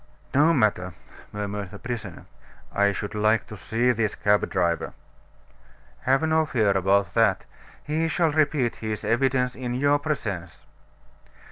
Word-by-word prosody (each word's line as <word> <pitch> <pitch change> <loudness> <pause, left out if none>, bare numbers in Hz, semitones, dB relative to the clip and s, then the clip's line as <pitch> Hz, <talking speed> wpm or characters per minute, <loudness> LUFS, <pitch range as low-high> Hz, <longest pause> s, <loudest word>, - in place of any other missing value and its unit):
"No 150 +4 +5
matter," 105 - +1 0.4
murmured 105 -1 -4
the 100 - -10
prisoner. 110 -6 -6 0.5
"I 100 0 +3
should 100 +1 -5
like 110 +1 +2
to 105 - -9
see 120 +4 0
this 110 -3 -1
cab 105 0 +2
driver." 85 -1 0 1.1
"Have 135 +4 +1
no 160 0 +3
fear 110 -8 +2
about 95 +1 +2
that; - - +2 0.4
he 155 +2 -1
shall 165 -1 +1
repeat 145 -5 +1
his 110 -1 -4
evidence 125 0 +1
in 125 -1 -4
your 145 +2 +2
presence." 95 - -4
115 Hz, 135 wpm, -25 LUFS, 100-140 Hz, 1.1 s, No